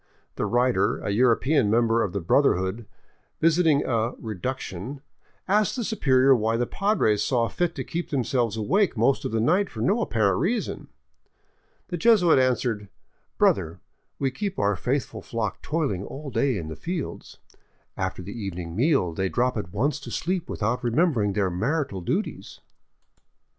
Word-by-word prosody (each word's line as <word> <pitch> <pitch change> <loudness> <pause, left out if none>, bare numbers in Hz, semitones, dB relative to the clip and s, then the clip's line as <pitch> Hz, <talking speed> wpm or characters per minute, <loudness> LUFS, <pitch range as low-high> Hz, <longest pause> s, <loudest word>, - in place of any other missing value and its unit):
The - - -1
writer, 120 -5 +2
a - - -3
European 125 +3 +3
member 115 +1 +3
of 100 - -1
the 100 - -3
brother 140 - +3
hood, 95 +5 -4 0.5
visiting 160 -3 +3
a 115 0 0
" - - -22
reduction," 125 +3 -5 0.5
asked 210 +2 +2
the 245 - -2
superior 135 - +3
why 115 0 0
the 120 - +1
Padres 160 - +1
saw 120 -3 +1
fit 175 +3 -1
to - - -3
keep 170 +1 -4
themselves 120 -5 0
awake 185 - +1
most 120 +5 +2
of - - -2
the 115 - 0
night 180 - +2
for - - -9
no 210 +5 +2
apparent 100 - +1
reason. 215 - -2 1.0
The 175 - -3
Jesuit 180 - +5
answered: 120 -5 0 0.2
" - - -45
Brother, 85 -2 +2 0.4
we 135 -1 0
keep 200 +6 -4
our 100 0 +1
faithful 125 +1 -2
flock 110 -1 -4
toiling 140 - -1
all 140 +5 -7
day 135 -4 +1
in 80 -4 -5
the 80 - -6
fields. 165 - -5 0.6
After 95 -1 -3
the 100 - -7
evening 90 -6 -5
meal 125 - +2
they 95 +3 -1
drop 125 +4 0
at 100 -6 -4
once 140 +9 0
to 135 - -9
sleep 180 0 -2
without 120 +4 -1
remembering 120 - +1
their 95 -2 0
marital 130 - -1
duties. 85 - -3
120 Hz, 165 wpm, -25 LUFS, 105-155 Hz, 1.0 s, Jesuit